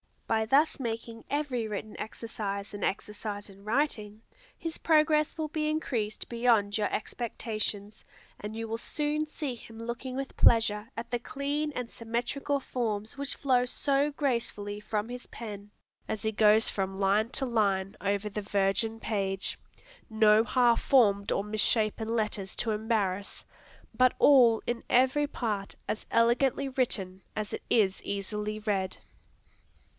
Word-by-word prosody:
By 220 -1 +1
thus 285 +6 +3
making 230 -2 -5
every 275 -6 -1
written 210 0 -6
exercise 210 -3 -5
an 205 - -5
exercise 205 0 -4
in 195 +1 -17
writing, 220 -4 0 0.4
his 330 -1 -3
progress 305 -1 +3
will 310 -1 -2
be 305 0 -1
increased 235 -9 -2
beyond 230 -4 +2
your 210 -2 0
expectations, 215 -2 -3 0.4
and 210 +1 -6
you 225 0 -4
will 225 +1 -2
soon 300 +3 -1
see 295 -3 -4
him 230 -1 -12
looking 235 +3 -5
with 270 0 -5
pleasure 225 -1 +4
at 235 +1 -5
the 240 - 0
clean 285 +4 -2
and 245 -3 -4
symmetrical 245 +5 -2
forms 220 -3 -2
which 280 0 -1
flow 255 -3 +2
so 280 +3 +1
gracefully 235 -8 -2
from 210 +1 -2
his 245 0 -7
pen, 205 -3 -8 0.4
as 215 - -3
he 220 - +1
goes 215 +1 +5
from 195 -1 -3
line 205 +3 +3
to 270 - -2
line 200 -5 +1
over 200 +1 0
the 210 +1 -4
virgin 200 +2 0
page, 195 -3 -2 0.5
no 220 0 +5
half 240 0 +3
formed 200 -7 +4
or 195 - +1
misshapen 215 +1 0
letters 210 -3 -2
to 230 - 0
embarrass, 210 -3 -1 0.5
but 255 -1 +4
all 245 -6 +6
in 240 -1 -2
every 260 +4 +4
part 210 -8 -3
as 215 - -3
elegantly 255 +4 +3
written 195 -8 -1
as 215 -1 -3
it - - -3
is 195 -4 +3
easily 210 +2 -3
read. 200 -3 -1
225 Hz, 145 wpm, -29 LUFS, 210-255 Hz, 0.5 s, all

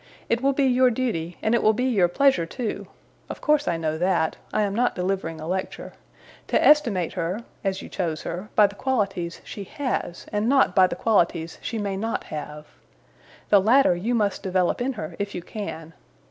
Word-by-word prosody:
It 230 +1 +1
will 275 +1 +2
be 280 - +1
your 255 0 +4
duty, 220 -9 -2
and 220 - +2
it 235 - +3
will 215 - +4
be 245 - -2
your 205 -9 +3
pleasure 270 -3 +2
too 235 +3 -4 0.4
of - - -6
course 300 -1 +2
I 170 - +1
know 160 -1 -2
that; 175 -3 +1 0.2
I 215 - +1
am 200 -1 -1
not 245 +4 +1
delivering 180 -3 -2
a 155 - -7
lecture 185 +2 -4 0.5
to - - +2
estimate 230 - +4
her 180 +7 -2 0.2
(as 195 -1 -2
you - - -8
chose 165 -4 -3
her) 180 +5 -5
by 210 - +7
the 200 - -2
qualities 200 -8 -2
she 205 - -7
has, 245 -6 -4
and 210 +3 +1
not 270 -8 +4
by 185 -1 +6
the - - -4
qualities 170 -6 +1
she 230 - -4
may 200 -2 -2
not 225 +3 -2
have. 150 0 -6 0.8
The 200 -2 +6
latter 230 -1 +4
you 220 +8 -1
must 205 -3 0
develop 185 +2 0
in 265 +2 0
her, 215 - -6
if 200 0 -3
you 175 - -5
can. 165 -7 -7
200 Hz, 200 wpm, -24 LUFS, 175-235 Hz, 0.8 s, by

